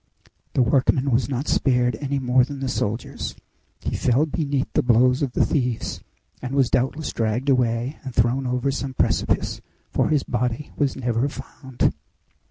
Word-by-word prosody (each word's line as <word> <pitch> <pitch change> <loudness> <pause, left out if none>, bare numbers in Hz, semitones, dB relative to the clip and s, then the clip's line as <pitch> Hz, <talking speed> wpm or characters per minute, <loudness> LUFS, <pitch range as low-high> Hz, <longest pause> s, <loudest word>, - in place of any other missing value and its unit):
The 130 - +5
workman 135 +1 +2
was 125 +3 +2
not 135 +2 -2
spared 125 -2 +2
any 140 0 -1
more 125 -1 +3
than 140 +2 -5
the 135 - -2
soldiers. 115 -2 -3 0.5
He - - -3
fell 130 +4 +2
beneath 145 -3 -1
he - - +4
blows 125 +2 +4
of 135 -4 -1
the - - +3
thieves, 125 -6 -1 0.4
and 130 +2 -4
was 135 -3 +3
doubtless 135 +5 0
dragged 115 +5 -1
away 125 +1 +1
and 130 - -5
thrown 120 +3 +1
over 125 +2 0
some 135 -1 -4
precipice, - - 0 0.3
for - - +1
his 150 -3 +2
body 125 +3 -2
was 140 -2 0
never 120 +2 0
found." 130 -2 -3
130 Hz, 165 wpm, -23 LUFS, 125-140 Hz, 0.5 s, The